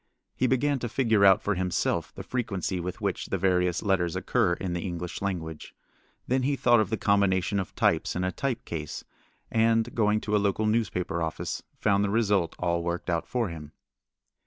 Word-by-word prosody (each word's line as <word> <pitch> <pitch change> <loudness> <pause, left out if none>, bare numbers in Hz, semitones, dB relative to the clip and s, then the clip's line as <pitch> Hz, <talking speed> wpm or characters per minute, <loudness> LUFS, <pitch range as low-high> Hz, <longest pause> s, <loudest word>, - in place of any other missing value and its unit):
He 130 - +1
began 135 +2 +1
to 120 - -3
figure 110 -4 +2
out 95 -1 +6
for 105 - +1
himself 90 -1 -1
the - - -7
frequency 100 -7 -2
with 90 +1 -5
which - - -2
the 95 - -1
various 90 -1 +1
letters 95 -4 +1
occur 95 +1 +1
in 90 0 -3
the 85 - -2
English 90 -1 -5
language. 80 -6 -4 0.5
Then 130 +1 +2
he 140 +2 +1
thought 120 -3 +4
of 105 -3 +1
the 110 - -1
combination 100 -1 +2
of 95 - -5
types - - +1
in 90 - -1
a 90 - 0
type 125 +3 -3
case, 75 -3 -5 0.5
and, 115 0 +2
going 105 -1 +2
to 105 - -1
a 105 - +3
local 100 +2 +1
newspaper 105 -6 0
office, 80 -1 -3 0.2
found 100 -1 +2
the 100 - 0
result 100 -6 +1
all 85 -1 0
worked 85 +1 -3
out 85 -1 -1
for 120 -5 -1
him. 75 -2 -9
100 Hz, 190 wpm, -27 LUFS, 90-115 Hz, 0.5 s, out